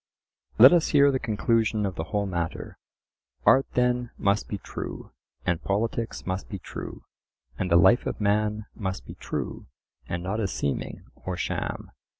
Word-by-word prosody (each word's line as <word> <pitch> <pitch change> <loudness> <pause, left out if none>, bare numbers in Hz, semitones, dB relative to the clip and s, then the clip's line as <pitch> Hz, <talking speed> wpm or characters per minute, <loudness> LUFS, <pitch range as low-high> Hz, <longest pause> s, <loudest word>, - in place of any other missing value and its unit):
"Let 130 +7 +10
us 170 -2 +4
hear 140 -1 +5
the 130 - 0
conclusion 110 -1 +1
of 95 - -2
the 80 -2 -4
whole 100 +4 -1
matter:" 85 -4 -4 0.7
Art 135 - +6
then 125 -1 +2
must 100 +1 +1
be 100 - -3
true, - - -7 0.3
and 90 -2 0
politics 115 +3 -2
must 95 +1 -3
be 100 - -4
true, - - -8 0.6
and 90 - -1
the 85 - +4
life 115 +8 +5
of - - -3
man 105 +1 +1
must 95 -3 -4
be - - -8
true - - -5 0.4
and 85 0 -3
not 100 +4 -2
a 105 - +1
seeming 70 -6 -3
or 95 -1 -5
sham. - - -3
105 Hz, 160 wpm, -26 LUFS, 95-115 Hz, 0.7 s, Let